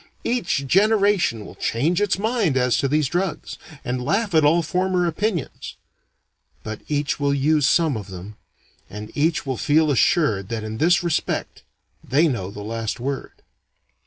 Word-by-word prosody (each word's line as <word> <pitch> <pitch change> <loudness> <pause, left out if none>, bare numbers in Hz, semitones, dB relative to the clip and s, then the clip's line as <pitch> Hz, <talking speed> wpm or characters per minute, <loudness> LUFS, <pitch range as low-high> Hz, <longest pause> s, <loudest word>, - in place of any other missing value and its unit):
Each 180 - -1
generation 200 - +2
will - - -10
change 145 - 0
its 205 -2 +1
mind 210 - 0
as 125 -1 +2
to 140 - +1
these 150 +1 +1
drugs, 180 +5 -3 0.3
and 125 0 -2
laugh 200 - 0
at 160 -1 +4
all 165 +3 +4
former 180 +2 0
opinions; 175 - -3 0.9
but 110 0 -6
each 145 -1 -1
will 140 -1 +1
use 150 +1 +2
some 160 -6 +2
of 105 -3 -6
them, 95 +2 -9 0.5
and 105 +1 -8
each 155 +2 +1
will 130 -2 -2
feel 155 +1 +2
assured 115 - +2
that 115 -2 -3
in 110 0 -6
this 175 +3 +3
respect 170 -3 -2 0.4
they 150 +6 +3
know 115 -10 -2
the 105 +1 -8
last 115 +1 -4
word. 135 +2 -5
145 Hz, 160 wpm, -22 LUFS, 120-175 Hz, 0.9 s, at